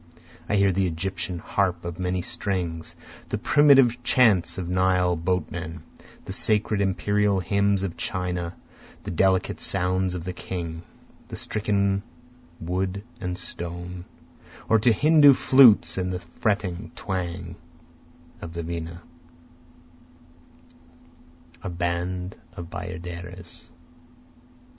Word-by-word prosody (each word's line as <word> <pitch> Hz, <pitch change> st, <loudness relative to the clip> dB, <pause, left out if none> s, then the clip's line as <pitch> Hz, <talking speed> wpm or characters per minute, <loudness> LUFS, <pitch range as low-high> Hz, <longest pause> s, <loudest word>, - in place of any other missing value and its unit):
I 105 Hz, -, +2 dB
hear 100 Hz, -1 st, +4 dB
the 95 Hz, 0 st, +1 dB
Egyptian 90 Hz, +1 st, -3 dB
harp 90 Hz, 0 st, -1 dB
of 85 Hz, +1 st, -5 dB
many 90 Hz, -1 st, -1 dB
strings, 85 Hz, -2 st, -3 dB, 0.3 s
The -, -, -1 dB
primitive 135 Hz, -5 st, +5 dB
chants 110 Hz, -9 st, +3 dB
of 90 Hz, -2 st, -4 dB
the 90 Hz, -, -3 dB
Nile 90 Hz, -1 st, +3 dB
boatmen, 85 Hz, -2 st, -3 dB, 0.4 s
The -, -, -5 dB
sacred 105 Hz, -1 st, +1 dB
imperial 100 Hz, +1 st, +1 dB
hymns 100 Hz, +2 st, +1 dB
of 85 Hz, -4 st, -4 dB
China, 90 Hz, -1 st, -3 dB, 0.4 s
To -, -, -27 dB
the -, -, -5 dB
delicate 95 Hz, +2 st, +1 dB
sounds 90 Hz, +1 st, 0 dB
of 85 Hz, -, -5 dB
the 90 Hz, +1 st, -4 dB
king, 85 Hz, -2 st, -5 dB, 0.5 s
(the -, -, -7 dB
stricken 100 Hz, -2 st, 0 dB, 0.6 s
wood 95 Hz, +3 st, -2 dB, 0.2 s
and 90 Hz, -1 st, -3 dB
stone,) 90 Hz, 0 st, -6 dB, 0.6 s
Or 110 Hz, -, +4 dB
to 115 Hz, +3 st, +4 dB
Hindu 145 Hz, +4 st, +6 dB
flutes 115 Hz, -11 st, +6 dB
and 90 Hz, 0 st, -1 dB
the 90 Hz, -, -2 dB
fretting 95 Hz, +2 st, -2 dB
twang 85 Hz, -3 st, -4 dB, 0.9 s
of 85 Hz, -, -7 dB
the 85 Hz, 0 st, -4 dB
vina, 85 Hz, +1 st, -6 dB, 2.6 s
A 95 Hz, -, -4 dB
band 90 Hz, +1 st, -2 dB, 0.2 s
of 85 Hz, -1 st, -9 dB
bayaderes. 90 Hz, 0 st, -8 dB
90 Hz, 115 wpm, -25 LUFS, 85-100 Hz, 2.6 s, Hindu